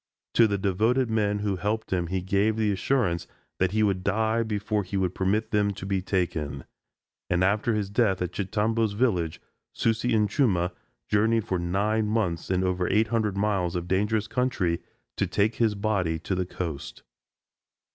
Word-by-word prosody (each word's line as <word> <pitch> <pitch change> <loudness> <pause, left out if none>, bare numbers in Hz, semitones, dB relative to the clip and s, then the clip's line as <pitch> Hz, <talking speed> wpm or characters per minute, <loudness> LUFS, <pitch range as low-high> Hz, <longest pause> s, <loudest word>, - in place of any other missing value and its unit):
To 115 - +6
the 100 -1 0
devoted 110 +6 +1
men 105 -2 +1
who 100 -2 0
helped 105 +3 -2
him 90 -2 0
he 95 +1 -2
gave 100 +3 +2
the 110 -2 +2
assurance 95 -4 0 0.3
that 95 - +3
he 110 +1 +2
would 95 -3 +1
die 110 +3 +1
before 105 -1 -1
he 95 +1 -4
would 95 -2 0
permit 105 +4 0
them 105 -1 +2
to 95 - -7
be 95 -1 0
taken; 80 -8 -2 0.7
and 90 0 +2
after 105 +4 +2
his 100 -2 -2
death 105 -3 +2
at 90 -2 -2
Chitambo's 110 +2 0
village 95 -9 0 0.3
Susi 115 +1 +1
and 105 -1 +3
Chuma 95 - +1 0.4
journeyed 110 +1 +2
for 95 -5 -1
nine 105 +5 0
months 105 -6 -1
and 95 0 +1
over 90 -1 0
eight 110 +2 +2
hundred 110 -4 0
miles 100 -4 0
of 90 0 -3
dangerous 105 +3 +1
country 115 -11 0 0.4
to - - +1
take 105 +3 +1
his 110 -3 +2
body 100 -6 0
to 85 +4 -4
the 90 -1 -1
coast. 80 -7 -6
100 Hz, 175 wpm, -26 LUFS, 90-110 Hz, 0.7 s, To